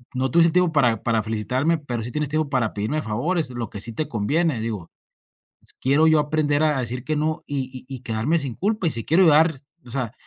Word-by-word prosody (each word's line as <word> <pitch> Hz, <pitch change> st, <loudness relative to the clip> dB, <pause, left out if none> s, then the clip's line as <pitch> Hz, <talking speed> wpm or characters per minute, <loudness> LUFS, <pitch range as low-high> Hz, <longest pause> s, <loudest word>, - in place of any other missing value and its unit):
no 130 Hz, +1 st, 0 dB
tuviste 170 Hz, +2 st, +5 dB
tiempo 180 Hz, -1 st, +3 dB
para 120 Hz, -7 st, +2 dB
para 115 Hz, -2 st, +1 dB
felicitarme, 125 Hz, +9 st, 0 dB
pero 120 Hz, -6 st, -4 dB
sí 120 Hz, -, -5 dB
tienes 150 Hz, +2 st, -1 dB
tiempo 155 Hz, -1 st, -1 dB
para 125 Hz, -5 st, 0 dB
pedirme 110 Hz, +10 st, -2 dB
favores, 150 Hz, +8 st, -1 dB
lo 120 Hz, -3 st, -5 dB
que 105 Hz, -, -7 dB
sí 115 Hz, +2 st, -2 dB
te 150 Hz, +7 st, -3 dB
conviene. 140 Hz, +6 st, 0 dB
Digo, 105 Hz, -7 st, -5 dB, 0.7 s
pues, -, -, -17 dB
quiero 145 Hz, +4 st, +4 dB
yo 155 Hz, -1 st, +5 dB
aprender 150 Hz, 0 st, +1 dB
a 150 Hz, -3 st, +2 dB
decir 125 Hz, 0 st, -3 dB
que 155 Hz, -, -1 dB
no, 155 Hz, +1 st, -1 dB
y 130 Hz, -3 st, -5 dB
y 135 Hz, -, -5 dB
y 130 Hz, -, -9 dB
quedarme 120 Hz, +7 st, 0 dB
sin 135 Hz, -6 st, -3 dB
culpa. 205 Hz, -2 st, 0 dB
Y -, -, +1 dB
si 115 Hz, -3 st, +1 dB
quiero 175 Hz, +5 st, +4 dB
ayudar, 160 Hz, 0 st, +5 dB, 0.3 s
o 120 Hz, -, -10 dB
sea, 120 Hz, -3 st, -3 dB
135 Hz, 230 wpm, -23 LUFS, 115-155 Hz, 0.7 s, tuviste